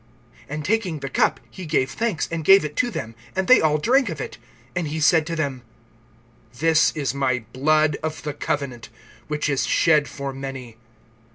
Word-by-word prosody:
(23)And 150 +2 -4
taking 190 -4 0
the 135 - -5
cup, - - +2
he 185 -3 -8
gave 140 -4 +1
thanks, 220 -7 -1
and 165 -1 -3
gave 195 +1 +6
it 150 -1 -6
to 245 - +1
them; 115 - -5 0.2
and 190 0 -1
they 255 - +7
all 155 -1 +3
drank 250 - +2
of 160 -4 -5
it. 125 - -6 0.4
(24)And 175 -3 -1
he 155 +2 -3
said 160 0 +4
to 170 - -3
them: 140 -5 -2 1.0
This 160 +2 +3
is 145 -4 -1
my 130 -4 -1
blood 155 +2 +2
of 155 0 -4
the 150 -2 -3
covenant, 140 -5 -3 0.4
which 150 0 -2
is 140 -2 0
shed 155 -3 +3
for 140 -1 -6
many. 135 -3 -7
150 Hz, 185 wpm, -23 LUFS, 140-165 Hz, 1.0 s, they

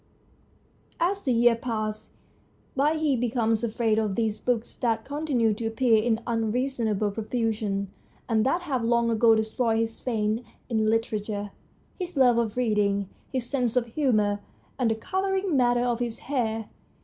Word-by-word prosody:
As 390 +4 +1
the 265 - 0
years 235 -1 +4
pass 215 -3 -3 0.6
by 290 +4 +2
he 310 -3 +1
becomes 230 -2 0
afraid 220 -1 +1
of 210 -3 -1
these 220 -2 0
books 240 -2 -1
that 225 -2 0
continue 280 -6 +1
to 225 +2 -3
appear 225 -1 +3
in 225 0 +1
unreasonable 225 -2 0
profusion, 215 -3 -2 0.4
and 220 -2 +2
that 335 +8 +1
have 265 -8 -1
long 235 0 +2
ago 225 0 +5
destroyed 220 +1 0
his 225 0 -2
faith 220 -1 -1 0.3
in 220 -2 +1
literature, 210 -2 -1 0.5
his 360 -3 -5
love 245 -3 +5
of 230 -1 -2
reading, 205 -4 +1 0.2
his 255 -3 -2
sense 250 -4 -1
of 235 -2 0
humour, 215 -8 +2 0.4
and 245 -3 +2
the 220 - +1
colouring 380 - -1
matter 245 -2 +3
of 240 -1 0
his 240 -2 -3
hair. 225 -5 -2
230 Hz, 150 wpm, -26 LUFS, 220-250 Hz, 0.6 s, ago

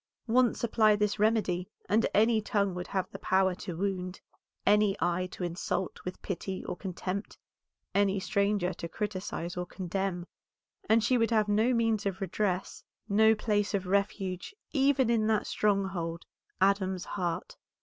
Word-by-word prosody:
Once 245 +1 +2
apply 220 -2 +4
this 210 0 0
remedy 205 -4 +1 0.2
and 215 +4 +3
any 220 +1 +4
tongue 200 -2 0
would 180 0 -5
have 190 -2 -1
the - - -8
power 190 0 +2
to 175 -1 -6
wound, 185 -1 -2 0.5
any 205 -1 +4
eye 175 +1 0
to 180 - -7
insult 175 +1 -3
with 180 - -6
pity 190 0 -4
or - - -3
contempt, 190 +2 -5 0.6
any 200 0 +2
stranger 200 0 +1
to 170 - -6
criticise 185 -4 -4
or 180 - -2
condemn, 185 -1 -3 0.6
and 220 0 +5
she 250 +3 +3
would 230 - +2
have 215 -2 +2
no 215 +4 +3
means 225 -4 +1
of 190 -1 -3
redress, 190 -1 -2 0.2
no 220 +1 +5
place 210 -1 0
of 195 -1 -1
refuge, 195 - -1 0.2
even 270 -2 +3
in 220 -2 +2
that 220 -1 +2
stronghold, 190 -5 -1 0.3
Adam's 190 -1 +2
heart. 175 -4 -3
200 Hz, 150 wpm, -30 LUFS, 185-215 Hz, 0.6 s, and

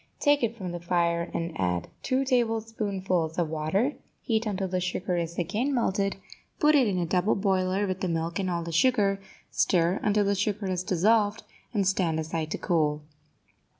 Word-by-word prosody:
Take 290 -1 +3
it 235 -1 -1
from 185 -4 -5
the 175 - -5
fire 170 -1 0
and 170 0 -3
add 90 -2 0
two 265 +1 0
tablespoonfuls 215 - 0
of 170 -3 0
water; 160 - 0 0.3
heat 225 -2 0
until 195 -2 -1
the 185 0 -1
sugar 180 +1 -2
is 170 0 -3
again 225 - 0
melted, 195 -4 0 0.4
put 300 0 +5
it 270 -5 +5
in 195 -3 0
a 175 - 0
double 180 +4 +1
boiler 190 0 +1
with 185 -1 -3
the 185 - 0
milk 165 0 -2
and 190 -1 -1
all 170 -1 -1
the 170 - -5
sugar, 200 +1 +2 0.3
stir 175 +1 +2
until 210 -1 +2
the 200 - +2
sugar 205 +1 -1
is 185 -2 -1
dissolved, 205 +4 +2 0.3
and 200 -5 +1
stand 175 -4 +1
aside 160 0 -3
to - - -2
cool. 150 -3 0
190 Hz, 185 wpm, -27 LUFS, 170-210 Hz, 0.4 s, put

